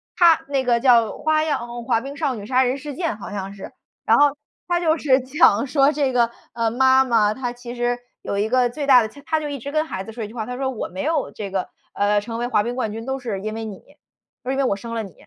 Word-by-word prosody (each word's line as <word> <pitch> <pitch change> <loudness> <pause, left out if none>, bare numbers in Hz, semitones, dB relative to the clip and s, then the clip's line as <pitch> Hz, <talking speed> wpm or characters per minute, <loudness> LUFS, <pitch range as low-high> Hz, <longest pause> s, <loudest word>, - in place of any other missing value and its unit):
它 340 -3 +5
那 275 -2 +1
个 240 -2 +2
叫 235 -3 +5 0.2
《花漾少女杀人事件》， 265 - -1
好 205 - -8
像 195 -1 -5
是。 195 - -9 0.3
然 - - +5
后 290 -1 +4 0.3
它 350 0 +1
就 325 -2 +2
是 270 -4 +3
讲 255 -3 +3
说 275 +1 +4
这 285 -3 0
个 240 -2 +3 0.2
呃 230 -1 0
妈 260 +2 +5
妈 220 -4 +2
她 245 -1 -4
其 240 0 -9
实 240 0 0 0.2
有 200 - -3
一 205 - +1
个 250 -1 +3
最 285 +3 -5
大 255 -3 +8
的 220 - -1
切 285 - -15
她 320 -1 +1
就 300 - -4
一 280 -2 -5
直 280 - -6
跟 310 +1 +1
孩 190 -11 -5
子 225 - -8
说 225 -1 -5
一 - - -4
句 225 - -13
话， 220 -3 -4
她 250 +1 -5
说： 265 0 -1
“我 230 - -4
没 185 +1 -6
有 310 -2 0
这 200 -3 -6
个 190 -2 -2 0.3
呃 205 +1 +2
成 230 +1 -6
为 240 - -1
滑 215 -4 +2
冰 240 +2 -3
冠 235 -4 -2
军 225 +1 -6
都 265 0 -3
是 220 -7 -4
因 215 +1 -4
为 225 0 -5
你。” 200 -3 -7 0.7
她 255 - -5
说： - - +1
“因 - - -2
为 275 - +2
我 250 - +1
生 230 +3 -7
了 225 - -2
你。” 195 -4 -10
245 Hz, 295 characters per minute, -22 LUFS, 225-275 Hz, 0.7 s, 大